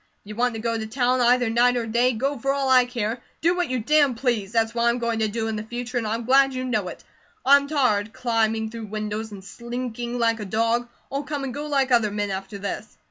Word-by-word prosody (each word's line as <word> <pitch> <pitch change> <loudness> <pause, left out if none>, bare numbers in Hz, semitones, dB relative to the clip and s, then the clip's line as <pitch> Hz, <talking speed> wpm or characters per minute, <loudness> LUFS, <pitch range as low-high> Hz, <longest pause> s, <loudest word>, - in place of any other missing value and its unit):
If - - -14
you 210 - -6
want 240 0 +1
to - - -4
go 230 +1 -1
to 220 - -4
town, 250 +2 +1
either 245 0 +4
night 245 +2 +3
or 235 - -1
day, 240 +3 +2
go 275 +6 -1
for 275 +4 0
all 275 -1 0
I 255 -1 +6
care. 235 -1 -3 0.2
Do 345 +3 +3
what 355 -5 -1
you 255 - 0
damn 285 +2 +3
please; 230 -5 -1
that's 225 -1 +1
what 235 0 0
I - - +5
am 235 - +1
going 235 -2 -1
to 220 - +2
do 225 +1 -2
in 220 - -2
the 215 - -3
future 245 +2 -4
and 225 - -3
I'm 225 +2 -2
glad 270 +1 +4
you 255 - -2
know 220 -7 -1
it. - - -9 0.4
I'm 280 +1 +6
tired 225 -8 +1
climbing 225 -2 0
through 225 -2 -7
windows 215 +1 -4
and 195 -2 -9
slinking 240 +2 -5
like 230 -1 +1
a 210 - -5
dog. 230 +4 0 0.2
I'll 275 +1 -1
come 290 -1 -4
and 265 -2 -4
go 295 +2 -5
like 275 -3 +1
other 230 -3 +4
men 205 0 -2
after 195 +2 -5
this." 200 +2 -6
235 Hz, 255 wpm, -24 LUFS, 220-255 Hz, 0.4 s, I